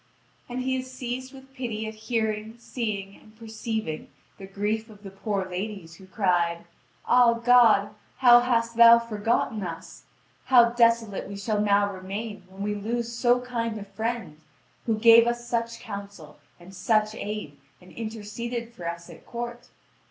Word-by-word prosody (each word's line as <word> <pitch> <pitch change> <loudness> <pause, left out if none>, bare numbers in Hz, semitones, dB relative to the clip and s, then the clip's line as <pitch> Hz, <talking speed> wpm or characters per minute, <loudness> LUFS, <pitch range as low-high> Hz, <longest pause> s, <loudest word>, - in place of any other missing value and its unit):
And 250 +1 -3
he 260 0 0
is 255 0 -6
seized 255 0 -5
with 270 -1 -15
pity 235 -5 -4
at 220 - -6
hearing, 220 0 -3
seeing, 210 -5 -4
and 215 0 -20
perceiving 220 -6 -5 0.3
the 195 - -9
grief 210 +3 -2
of 210 -1 -16
the 195 - -9
poor 195 -1 -3
ladies, 185 -3 -6
who 190 - -15
cried: 175 -4 0 0.4
"Ah, 245 -1 +5
God, 230 -4 +5 0.3
how 240 -2 +8
hast 235 -1 0
Thou 235 0 +9
forgotten 225 -1 -1
us! 170 -3 -8 0.4
How 240 -3 +6
desolate 230 -3 +2
we 200 - -7
shall 210 +1 -1
now 205 -1 +2
remain 200 +3 -6
when 190 +1 -8
we 210 0 -1
lose 230 +3 -3
so 245 +1 +2
kind 230 -3 -3
a 205 - -6
friend, 220 -7 -4 0.5
who 225 -2 +1
gave 230 +1 +7
us 240 0 -2
such 230 -1 -2
counsel 200 -8 -9 0.2
and 175 +2 -14
such 215 +3 +1
aid, 210 -10 -6 0.2
and 180 0 -17
interceded 230 +2 -6
for 175 -6 -5
us 170 0 -7
at - - -13
court! 240 0 -7
220 Hz, 160 wpm, -26 LUFS, 200-235 Hz, 0.5 s, Thou